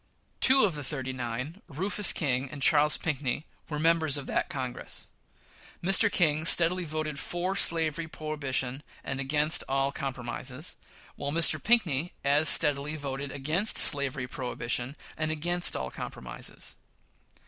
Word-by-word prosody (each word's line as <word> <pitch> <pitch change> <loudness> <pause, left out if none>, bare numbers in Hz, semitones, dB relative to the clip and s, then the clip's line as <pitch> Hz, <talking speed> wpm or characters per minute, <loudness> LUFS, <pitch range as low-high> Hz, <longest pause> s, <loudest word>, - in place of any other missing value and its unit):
Two 265 -2 +6
of 190 - -1
the 145 -1 -7
"thirty 130 0 -4
nine" 130 - -6
Rufus 195 +7 +2
King 135 -3 -2
and 140 0 -6
Charles 150 +1 +5
Pinckney 150 -1 -3 0.2
were 150 - -4
members 160 -2 +2
of 140 - -6
that - - -2
Congress. 130 -6 -5 0.8
Mr. 195 +4 +5
King 155 -3 +1
steadily 175 +2 +5
voted 155 -1 -4
for 180 +2 -2
slavery 165 -3 0
prohibition 140 -4 -3 0.2
and 135 0 -5
against 150 +3 +2
all 135 +1 0
compromises, 130 +2 -4 0.4
while 140 0 -4
Mr. 160 -1 +4
Pinckney 175 - +1
as 145 +2 +5
steadily 145 +1 +5
voted 140 -1 -6
against 155 +10 0
slavery 140 -3 +2
prohibition, 125 +1 -5 0.2
and 155 0 -2
against 175 +3 +1
all 65 -1 -5
compromises. - - -6
150 Hz, 135 wpm, -27 LUFS, 135-165 Hz, 0.8 s, Two